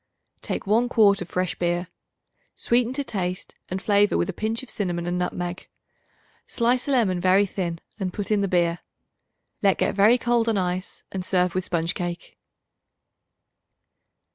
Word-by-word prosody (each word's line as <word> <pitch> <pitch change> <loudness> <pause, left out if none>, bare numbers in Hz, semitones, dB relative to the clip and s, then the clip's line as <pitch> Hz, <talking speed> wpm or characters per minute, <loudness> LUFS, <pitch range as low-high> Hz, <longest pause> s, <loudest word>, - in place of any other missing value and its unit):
Take - - -4
one 225 +5 +2
quart 205 -5 +4
of 180 - -6
fresh 180 0 -1
beer. 175 0 -1 0.7
Sweeten 240 0 +1
to 285 +1 -2
taste 185 -7 -4 0.2
and 185 - -2
flavor 205 +1 +3
with - - 0
a - - -17
pinch 220 +6 -2
of 260 - -10
cinnamon 175 -4 -2
and 175 +1 -1
nutmeg. 180 0 -3 0.8
Slice 245 +3 +1
a - - 0
lemon 200 -9 +2
very 190 +2 +4
thin 180 -3 -3 0.2
and 190 -2 -2
put 205 +3 -5
in 210 -1 +3
the 200 - +1
beer. 175 -2 +1 0.8
Let 195 -2 +3
get - - +1
very 210 +5 +5
cold 240 -2 +1
on 220 - +1
ice 180 0 -3
and 190 -1 -4
serve 180 -1 +1
with 185 -1 -1
sponge 170 0 -1
cake. 175 -2 -6
190 Hz, 165 wpm, -24 LUFS, 180-220 Hz, 0.8 s, very